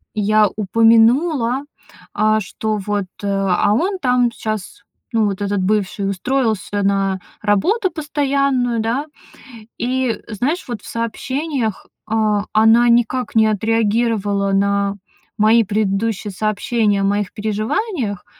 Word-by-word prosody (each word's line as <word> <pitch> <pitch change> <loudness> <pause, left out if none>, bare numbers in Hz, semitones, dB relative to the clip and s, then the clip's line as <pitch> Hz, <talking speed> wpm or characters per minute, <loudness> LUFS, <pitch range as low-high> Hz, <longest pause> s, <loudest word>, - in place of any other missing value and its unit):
я 215 0 +3
упомянула, 230 - +3 0.5
а, 215 +1 +2
что 215 +2 -3
вот, 205 0 -2 0.2
э, - - -2
а, 195 +1 +1
он 375 - 0
там 250 -3 +2
щас, 215 -4 -5 0.3
ну, 225 -2 +2
вот 200 -1 -2
этот 200 -1 -1
бывший, 200 0 0
устроился 215 -2 -1
на 195 -1 +1 0.2
работу 360 - +1
постоянную, 275 -5 0
да. 235 +7 -1 0.7
И, 255 0 -1
знаешь, 255 - -2
вот 235 -4 -5
в - - -14
сообщениях, 250 +1 -3 0.2
а, 215 -2 +1
она 225 +2 +5
никак 240 +2 +1
не 220 -1 +5
отреагировала 215 -2 0
на 200 0 +1 0.4
мои 220 +2 +4
предыдущие 205 0 -1
сообщения 215 +1 0
о - - 0
моих 200 -1 0
переживаниях, 215 - -2
220 Hz, 115 wpm, -19 LUFS, 205-240 Hz, 0.7 s, она